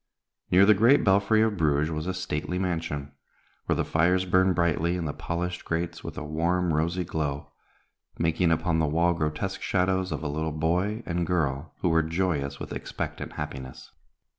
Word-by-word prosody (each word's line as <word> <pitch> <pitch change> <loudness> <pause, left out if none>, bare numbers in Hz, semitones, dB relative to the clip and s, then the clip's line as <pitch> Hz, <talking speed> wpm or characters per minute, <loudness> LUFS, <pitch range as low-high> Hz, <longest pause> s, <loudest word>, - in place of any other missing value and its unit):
Near 95 +2 +6
the 105 - +7
great 115 +8 +5
belfry 100 +2 +4
of 110 -2 0
Bruges 75 -1 +2
was 80 +2 -3
a 95 - -1
stately 75 -2 -3
mansion, 80 -6 -2 0.6
where - - +2
the - - 0
fires 90 +3 +2
burned 95 0 +3
brightly 85 0 +1
in 90 -2 -3
the 75 - -2
polished 90 +1 -4
grates 85 +1 -3
with - - -7
a - - -4
warm, 85 +3 0
rosy 85 +4 0
glow, 75 -3 -3 0.7
making 85 +1 +2
upon 80 0 +1
the 80 - +2
wall 85 +3 +2
grotesque 80 +5 -2
shadows 95 0 0
of - - -3
a - - -1
little 80 +2 -2
boy 90 +8 0
and 85 -1 -1
girl 75 -4 -1
who 90 - +2
were 80 0 +4
joyous 80 -4 -1
with - - -6
expectant - - -5
happiness. 65 -3 -7
85 Hz, 175 wpm, -27 LUFS, 75-90 Hz, 0.7 s, the